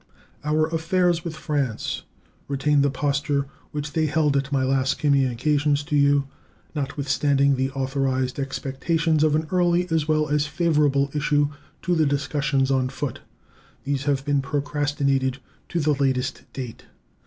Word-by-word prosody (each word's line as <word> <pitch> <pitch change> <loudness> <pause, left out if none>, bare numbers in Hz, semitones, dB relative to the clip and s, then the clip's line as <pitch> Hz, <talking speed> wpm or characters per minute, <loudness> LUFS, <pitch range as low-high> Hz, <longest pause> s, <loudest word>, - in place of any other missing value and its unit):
Our 155 +1 +2
affairs 165 +1 +1
with 165 -2 -5
France 145 -7 -2 0.5
retain 140 +1 +2
the 140 - +3
posture 140 +1 0 0.2
which 150 0 -5
they 160 -1 +1
held 150 -1 +2
at 140 0 0
my 135 -2 +1
last 135 0 +1
communications 145 +1 +2
to 150 - -2
you. 140 -1 +3 0.5
Notwithstanding 140 -1 +1
the 130 +1 0
authorized 135 -1 -1
expectations 150 +4 0
of 155 -1 +3
an 155 +1 0
early 175 -1 +2
as 160 -2 +1
well 155 -1 +2
as 150 0 +1
favorable 150 -3 +2
issue 145 0 +2 0.3
to 180 - +1
the 160 -3 +3
discussions 140 -1 0
on 130 -1 +1
foot, 130 -1 -4 0.6
these 140 -1 -2
have 140 -1 0
been 145 -2 +2
procrastinated 140 -2 0 0.3
to 175 - -1
the 150 -1 +2
latest 135 -2 -1
date. 125 -4 -7
145 Hz, 140 wpm, -24 LUFS, 135-150 Hz, 0.6 s, the